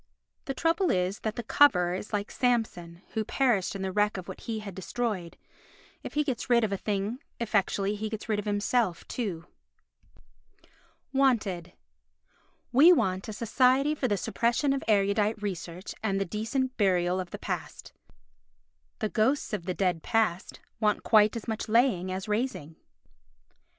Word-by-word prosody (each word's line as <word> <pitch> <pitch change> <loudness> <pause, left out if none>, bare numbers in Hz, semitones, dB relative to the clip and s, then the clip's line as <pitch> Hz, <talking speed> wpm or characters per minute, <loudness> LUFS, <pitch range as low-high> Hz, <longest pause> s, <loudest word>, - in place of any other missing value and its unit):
The 270 - -3
trouble 335 +5 +1
is 185 +2 0
that 220 0 -3
the 240 - -4
coverer 180 -9 +4
is 190 +3 -5
like 205 -1 -2
Samson 195 -8 -1
who 220 - -2
perished 225 -5 +1
in 195 - -4
the 190 - -2
wreck 210 +1 +1
of 185 - -7
what - - -8
he 230 -2 -4
had 210 -2 -7
destroyed; 190 -1 -3 0.6
if - - -8
he 300 - +3
gets 260 -5 -3
rid 235 -1 +4
of 215 - 0
a - - +1
thing 205 +4 -2 0.2
effectually 205 -3 0
he 215 +1 -4
gets 220 -1 -6
rid 215 -2 0
of 210 - -5
himself 205 -2 0
too. 185 -9 -4 1.7
Wanted 220 -11 +1 1.0
We 295 +8 +8
want 190 - +1
a - - -4
Society 255 +6 +2
for 285 -4 -1
the 205 -3 +1
Suppression 235 +7 +1
of 275 - -2
Erudite 205 +1 +2
Research 185 -2 -5
and 195 -3 0
the 195 - 0
Decent 235 +7 -2
Burial 180 -3 +2
of 180 -2 -4
the - - -6
Past. - - -6 1.0
The 215 - -2
ghosts 240 +4 +1
of 185 -5 -3
the 185 - -1
dead 180 -4 0
past 215 -5 0 0.2
want 210 -2 +1
quite 215 -1 +5
as 230 - -6
much 220 0 -3
laying 215 -6 +2
as 190 +2 -4
raising. 210 - -2
210 Hz, 160 wpm, -28 LUFS, 190-240 Hz, 1.7 s, We